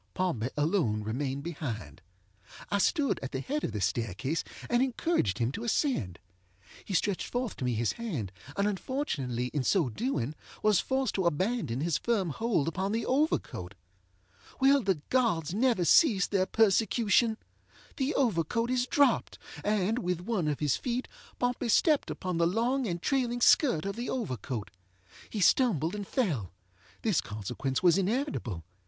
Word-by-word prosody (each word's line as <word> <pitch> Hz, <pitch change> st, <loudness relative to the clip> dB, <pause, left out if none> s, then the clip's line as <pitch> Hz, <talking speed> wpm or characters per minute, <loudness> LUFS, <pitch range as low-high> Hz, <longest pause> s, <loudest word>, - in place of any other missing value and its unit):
Pompey 130 Hz, -11 st, -1 dB
alone 145 Hz, -, +1 dB
remained 135 Hz, +5 st, -3 dB
behind. 140 Hz, -, -5 dB, 0.7 s
I 200 Hz, -, +2 dB
stood 285 Hz, -, +2 dB
at 135 Hz, -, -6 dB
the 130 Hz, -, -1 dB
head 290 Hz, -, -3 dB
of -, -, -1 dB
the 105 Hz, -1 st, -4 dB
staircase, 115 Hz, -, -1 dB, 0.2 s
and 240 Hz, 0 st, +2 dB
encouraged 260 Hz, -, 0 dB
him 120 Hz, +1 st, 0 dB
to 220 Hz, -, -6 dB
ascend. 230 Hz, -, 0 dB, 0.7 s
He 195 Hz, -, -4 dB
stretched 195 Hz, +1 st, 0 dB
forth 245 Hz, -3 st, -3 dB
to 130 Hz, -, -3 dB
me 125 Hz, -2 st, 0 dB
his 115 Hz, 0 st, +1 dB
hand, 160 Hz, -, -4 dB, 0.3 s
and 200 Hz, +1 st, +2 dB
unfortunately 145 Hz, -, -2 dB
in 145 Hz, -3 st, 0 dB
so 165 Hz, -3 st, +2 dB
doing 150 Hz, -, -2 dB, 0.3 s
was 210 Hz, -3 st, +4 dB
forced 265 Hz, -3 st, 0 dB
to 190 Hz, -3 st, +1 dB
abandon 170 Hz, -, -1 dB
his 165 Hz, -1 st, 0 dB
firm 205 Hz, -8 st, 0 dB
hold 205 Hz, -5 st, 0 dB
upon 190 Hz, +4 st, -1 dB
the 230 Hz, -, -1 dB
overcoat. 255 Hz, -, -1 dB, 0.8 s
Will 275 Hz, +1 st, +5 dB
the 190 Hz, -8 st, 0 dB
gods 200 Hz, -, +1 dB
never 225 Hz, -4 st, +2 dB
cease 210 Hz, -, +5 dB
their 190 Hz, -2 st, 0 dB
persecution? 220 Hz, +1 st, +3 dB, 0.6 s
The 275 Hz, +3 st, 0 dB
overcoat 230 Hz, -, +1 dB
is 250 Hz, 0 st, +1 dB
dropped, 285 Hz, +1 st, +2 dB, 0.3 s
and, 210 Hz, +2 st, +1 dB
with 180 Hz, -5 st, -2 dB
one 185 Hz, -4 st, -1 dB
of 150 Hz, -1 st, -2 dB
his 145 Hz, -4 st, +2 dB
feet, 250 Hz, 0 st, -2 dB, 0.3 s
Pompey 245 Hz, -1 st, -1 dB
stepped 300 Hz, +6 st, +3 dB
upon 185 Hz, -3 st, -3 dB
the 170 Hz, -, +4 dB
long 240 Hz, +7 st, 0 dB
and 175 Hz, -2 st, -2 dB
trailing 250 Hz, -3 st, 0 dB
skirt 240 Hz, -, +4 dB
of 200 Hz, -, -3 dB
the 240 Hz, -, -3 dB
overcoat. 130 Hz, -, -4 dB, 0.6 s
He 210 Hz, -, -3 dB
stumbled 180 Hz, -, +3 dB
and 205 Hz, -2 st, -5 dB
fellŌĆöthis 105 Hz, -, -2 dB
consequence 125 Hz, -, -3 dB
was 180 Hz, +1 st, +5 dB
inevitable. 195 Hz, -, -2 dB
190 Hz, 155 wpm, -29 LUFS, -, 0.8 s, Will